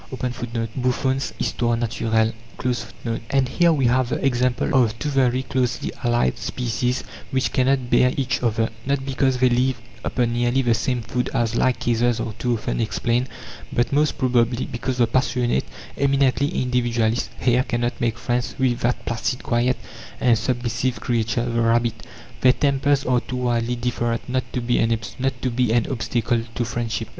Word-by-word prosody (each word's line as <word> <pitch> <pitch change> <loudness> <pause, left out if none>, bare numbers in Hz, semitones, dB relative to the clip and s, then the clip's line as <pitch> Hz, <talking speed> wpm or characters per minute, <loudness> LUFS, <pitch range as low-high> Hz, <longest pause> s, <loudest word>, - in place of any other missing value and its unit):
(17) 120 -2 -3 2.6
And 135 -2 +2
here 170 +5 +4
we 140 -5 +2
have 125 0 +2
the - - -1
example 125 -1 +1
of 110 -1 -2
two 150 - -2
very 130 -2 +2
closely 130 -2 -1
allied 120 - +1
species 125 +1 -1 0.3
which 130 -2 0
cannot 130 -1 +1
bear 125 - +5
each 130 -2 0
other 115 -2 +1 0.2
not 140 -1 0
because 135 -1 +1
they 130 0 +4
live 125 0 +1 0.2
upon 120 -2 0
nearly 120 +2 +1
the 120 -2 +3
same 120 +2 -1
food, 125 +2 -2
as 115 -1 +1
like 130 +1 +2
cases 120 0 +1
are 110 - -3
too 120 -1 +1
often 110 - -2
explained, 120 +3 0 0.4
but 120 +3 0
most 150 +1 +2
probably 125 -2 +2
because 125 +2 -3
the 120 - +4
passionate, 120 - +1 0.3
eminently 140 0 +2
individualist 120 -5 0
hare 125 0 +3
cannot 120 -1 -2
make 115 -1 0
friends 120 0 -2
with 125 -2 +1
that 120 +1 -1
placid, 115 +2 -2
quiet, 120 +1 +1 0.4
and 120 -2 +4
submissive 120 +1 -1
creature, 115 0 0
the 120 -1 0
rabbit. 115 -1 +1 0.3
Their 125 -1 +6
tempers 140 0 +1
are 125 -1 +3
too 130 - -6
widely 120 -1 0
different 120 -1 -2
not 130 +1 -2
to 125 - -1
be 120 +1 +1 0.9
an 115 -1 +3
obstacle 120 -1 0
to 120 - 0
friendship. 115 -1 -3
120 Hz, 150 wpm, -22 LUFS, 120-130 Hz, 2.6 s, Their